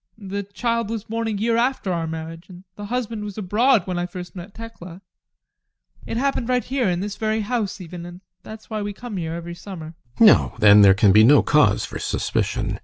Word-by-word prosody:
The 200 Hz, -1 st, -5 dB
child 225 Hz, +3 st, -2 dB
was 225 Hz, -2 st, -4 dB
born 225 Hz, +1 st, -3 dB
a -, -, -1 dB
year 225 Hz, +3 st, 0 dB
after 235 Hz, -6 st, 0 dB
our 165 Hz, -1 st, -2 dB
marriage, 160 Hz, +2 st, -7 dB
and 180 Hz, 0 st, -12 dB
the 205 Hz, -, -8 dB
husband 230 Hz, -1 st, -3 dB
was 205 Hz, -1 st, -7 dB
abroad 215 Hz, +2 st, +2 dB
when 180 Hz, -2 st, -3 dB
I 175 Hz, -, -2 dB
first 180 Hz, -1 st, -9 dB
met 185 Hz, +3 st, -10 dB
Tekla 190 Hz, -6 st, -10 dB, 1.1 s
it -, -, -3 dB
happened 260 Hz, -2 st, -1 dB
right 250 Hz, -1 st, +1 dB
here, 255 Hz, -5 st, -1 dB
in 175 Hz, 0 st, -1 dB
this 205 Hz, 0 st, -5 dB
very 220 Hz, 0 st, -1 dB
house 210 Hz, -2 st, -2 dB
even, 175 Hz, -1 st, -8 dB
and 175 Hz, +1 st, -11 dB, 0.2 s
that's 220 Hz, 0 st, -11 dB
why 215 Hz, -1 st, -4 dB
we 205 Hz, 0 st, -4 dB
come 235 Hz, -1 st, -7 dB
here 165 Hz, -2 st, -3 dB
every 170 Hz, 0 st, -7 dB
summer. 170 Hz, -3 st, -9 dB, 0.2 s
GUSTAV. 230 Hz, -, +6 dB
No, 210 Hz, -, +5 dB
then 105 Hz, 0 st, +7 dB
there 95 Hz, -1 st, +7 dB
can 100 Hz, 0 st, +4 dB
be 105 Hz, +3 st, +6 dB
no 140 Hz, +5 st, +6 dB
cause 145 Hz, -9 st, +3 dB
for -, -, -7 dB
suspicion. -, -, -2 dB
200 Hz, 215 wpm, -22 LUFS, 170-225 Hz, 1.1 s, then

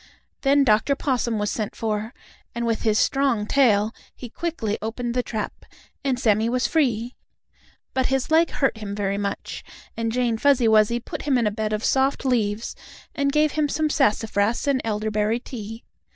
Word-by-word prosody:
Then 280 Hz, 0 st, +4 dB
Dr. 225 Hz, +3 st, +3 dB
Possum 250 Hz, -5 st, -1 dB
was 210 Hz, 0 st, -1 dB
sent 215 Hz, -3 st, -3 dB
for, 215 Hz, 0 st, -2 dB, 0.4 s
and 235 Hz, 0 st, -2 dB
with 230 Hz, -1 st, 0 dB
his 215 Hz, -2 st, +2 dB
strong 270 Hz, -6 st, +2 dB
tail 220 Hz, -4 st, +3 dB, 0.2 s
he 245 Hz, -, -9 dB
quickly 275 Hz, -12 st, -3 dB
opened 235 Hz, +2 st, -3 dB
the 250 Hz, -, +1 dB
trap, 220 Hz, -3 st, -5 dB, 0.4 s
and 265 Hz, -3 st, 0 dB
Sammie 220 Hz, -2 st, +2 dB
was 250 Hz, +1 st, 0 dB
free. 245 Hz, -6 st, +1 dB, 0.8 s
But 260 Hz, -1 st, +1 dB
his 270 Hz, +2 st, -1 dB
leg 325 Hz, +1 st, +5 dB
hurt 270 Hz, -5 st, 0 dB
him 200 Hz, -2 st, -5 dB
very 200 Hz, -1 st, -1 dB
much, 200 Hz, -1 st, -4 dB, 0.3 s
and 230 Hz, 0 st, -1 dB
Jane 235 Hz, -2 st, 0 dB
Fuzzy 270 Hz, -4 st, +4 dB
Wuzzy 220 Hz, +2 st, +4 dB
put -, -, -7 dB
him 275 Hz, -3 st, +1 dB
in 235 Hz, -, +1 dB
a 210 Hz, -, +2 dB
bed 215 Hz, +1 st, -2 dB
of 215 Hz, +1 st, -1 dB
soft 270 Hz, +1 st, +1 dB
leaves 225 Hz, -4 st, 0 dB, 0.4 s
and 280 Hz, -1 st, 0 dB
gave 300 Hz, +1 st, +3 dB
him 300 Hz, -2 st, 0 dB
some 310 Hz, +1 st, 0 dB
sassafras 220 Hz, -4 st, +1 dB
and 270 Hz, -2 st, +2 dB
elderberry 215 Hz, +1 st, 0 dB
tea. 225 Hz, -2 st, -8 dB
235 Hz, 175 wpm, -23 LUFS, 215-270 Hz, 0.8 s, leg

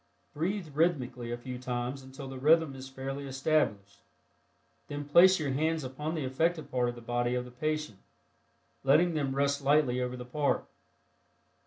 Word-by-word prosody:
Breathe 175 Hz, +3 st, -2 dB
rhythmically 125 Hz, -7 st, 0 dB
a 120 Hz, -, -2 dB
few 125 Hz, +1 st, -7 dB
times 125 Hz, +1 st, -3 dB
until 135 Hz, +1 st, -9 dB
the 135 Hz, -1 st, -7 dB
rhythm 155 Hz, +1 st, +4 dB
is 130 Hz, 0 st, -8 dB
fairly 135 Hz, +1 st, -5 dB
established, 135 Hz, -8 st, 0 dB, 0.9 s
then 145 Hz, 0 st, -5 dB
place 180 Hz, +6 st, +6 dB
your 145 Hz, -3 st, -1 dB
bands 155 Hz, +3 st, 0 dB
upon 150 Hz, +5 st, -4 dB
the 155 Hz, -4 st, -2 dB
affected 160 Hz, +5 st, 0 dB
part 125 Hz, -1 st, +1 dB
of 120 Hz, -, -5 dB
the 120 Hz, -, -10 dB
body 120 Hz, +1 st, 0 dB
of 125 Hz, 0 st, -2 dB
the 125 Hz, -, -11 dB
patient, 150 Hz, -4 st, -3 dB, 0.8 s
letting 155 Hz, +6 st, +4 dB
them 140 Hz, -4 st, -1 dB
rest 140 Hz, 0 st, +1 dB
lightly 140 Hz, -3 st, +3 dB
over 125 Hz, 0 st, -3 dB
the 125 Hz, -, -7 dB
part. 145 Hz, +3 st, 0 dB
135 Hz, 165 wpm, -30 LUFS, 125-155 Hz, 0.9 s, place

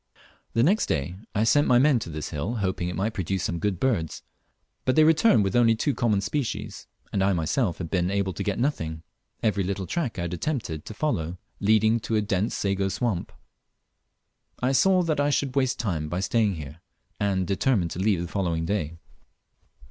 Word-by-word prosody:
The 115 Hz, -, +3 dB
next 195 Hz, -, +3 dB
day 70 Hz, +5 st, -1 dB, 0.2 s
I 105 Hz, -, +2 dB
sent 145 Hz, +6 st, +4 dB
my 125 Hz, -, +5 dB
men 135 Hz, -1 st, +4 dB
to 95 Hz, -, -6 dB
this 75 Hz, -2 st, -5 dB
hill, 85 Hz, +10 st, -3 dB
hoping 95 Hz, -4 st, -1 dB
it 90 Hz, -, -4 dB
might 105 Hz, +4 st, -1 dB
produce 95 Hz, -1 st, -2 dB
some 85 Hz, -, -2 dB
good 95 Hz, -1 st, -1 dB
birds; 105 Hz, -, -1 dB, 0.6 s
but 130 Hz, -, +1 dB
they 155 Hz, -, +6 dB
returned 160 Hz, -, +5 dB
with 95 Hz, -1 st, -1 dB
only 115 Hz, -2 st, +5 dB
two 140 Hz, +6 st, 0 dB
common 110 Hz, -6 st, +1 dB
species, 125 Hz, +4 st, -3 dB, 0.3 s
and 95 Hz, -, +2 dB
I 100 Hz, 0 st, +3 dB
myself 85 Hz, -, 0 dB
had 85 Hz, -3 st, -6 dB
been 90 Hz, -1 st, +1 dB
able 100 Hz, -1 st, 0 dB
to -, -, -5 dB
get 100 Hz, -2 st, -1 dB
nothing; 80 Hz, -, -2 dB, 0.4 s
every 105 Hz, -3 st, +2 dB
little 95 Hz, +1 st, -2 dB
track 150 Hz, -, -2 dB
I 85 Hz, -, -2 dB
had 85 Hz, 0 st, -3 dB
attempted 90 Hz, -, -3 dB
to 110 Hz, -, -8 dB
follow 90 Hz, -, -1 dB, 0.2 s
leading 110 Hz, +2 st, +3 dB
to 115 Hz, 0 st, -2 dB
a 105 Hz, -, +3 dB
dense 100 Hz, +1 st, 0 dB
sago 95 Hz, -1 st, 0 dB
swamp. 95 Hz, -1 st, -2 dB, 1.3 s
I 125 Hz, +1 st, +1 dB
saw 180 Hz, +7 st, +4 dB
that 155 Hz, -3 st, 0 dB
I 145 Hz, 0 st, +2 dB
should 140 Hz, -2 st, 0 dB
waste 135 Hz, 0 st, +1 dB
time 80 Hz, -9 st, -2 dB
by 90 Hz, -, -2 dB
staying 105 Hz, -1 st, +1 dB
here, 75 Hz, +1 st, -9 dB, 0.4 s
and 95 Hz, -2 st, +1 dB
determined 100 Hz, -2 st, +1 dB
to -, -, -5 dB
leave 95 Hz, -3 st, +2 dB
the -, -, -4 dB
following 85 Hz, -3 st, -1 dB
day. 85 Hz, -4 st, -2 dB
100 Hz, 195 wpm, -26 LUFS, 90-125 Hz, 1.3 s, they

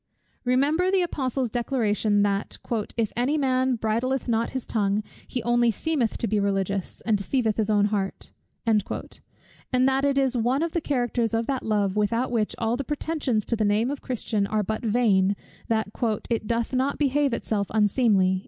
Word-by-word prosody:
Remember 290 Hz, +8 st, +2 dB
the 380 Hz, -1 st, +3 dB
Apostle's 260 Hz, -7 st, -2 dB
declaration, 215 Hz, -4 st, +1 dB
that 200 Hz, 0 st, -1 dB, 0.4 s
"if 225 Hz, -3 st, 0 dB
any 255 Hz, +6 st, +1 dB
man 260 Hz, -2 st, +2 dB
bridleth 235 Hz, +4 st, -1 dB
not 230 Hz, -1 st, +1 dB
his 260 Hz, -2 st, -4 dB
tongue, 205 Hz, -1 st, 0 dB, 0.2 s
he 250 Hz, -3 st, -3 dB
only 240 Hz, 0 st, +3 dB
seemeth 250 Hz, +1 st, 0 dB
to -, -, -2 dB
be 210 Hz, +1 st, +1 dB
religious, 195 Hz, -1 st, -1 dB
and 220 Hz, -, +1 dB
deceiveth 220 Hz, +2 st, 0 dB
his 220 Hz, -1 st, 0 dB
own 205 Hz, -1 st, +4 dB
heart;" 195 Hz, -2 st, -3 dB, 0.3 s
and 230 Hz, +3 st, -2 dB
that 270 Hz, 0 st, +2 dB
it 280 Hz, -1 st, +2 dB
is 265 Hz, -2 st, +2 dB
one 245 Hz, +5 st, +1 dB
of 335 Hz, -, -1 dB
the 340 Hz, -, -1 dB
characters 240 Hz, -5 st, 0 dB
of 225 Hz, 0 st, 0 dB
that 265 Hz, 0 st, -1 dB
love, 205 Hz, -3 st, 0 dB
without 230 Hz, +4 st, +1 dB
which 220 Hz, -3 st, 0 dB
all 230 Hz, 0 st, 0 dB
pretensions 280 Hz, -5 st, -1 dB
to 235 Hz, -, 0 dB
the 220 Hz, -, 0 dB
name 215 Hz, +5 st, +2 dB
of 285 Hz, -, -5 dB
Christian 220 Hz, -5 st, -1 dB
are 215 Hz, 0 st, 0 dB
but 215 Hz, +2 st, -3 dB
vain, 205 Hz, -4 st, +3 dB, 0.3 s
that 220 Hz, -2 st, 0 dB, 0.4 s
"it 225 Hz, -2 st, 0 dB
doth 230 Hz, +2 st, -1 dB
not 265 Hz, +2 st, +1 dB
behave 285 Hz, -1 st, +2 dB
itself 210 Hz, -3 st, -1 dB
unseemly." 205 Hz, -3 st, +3 dB
230 Hz, 170 wpm, -25 LUFS, 210-260 Hz, 0.4 s, own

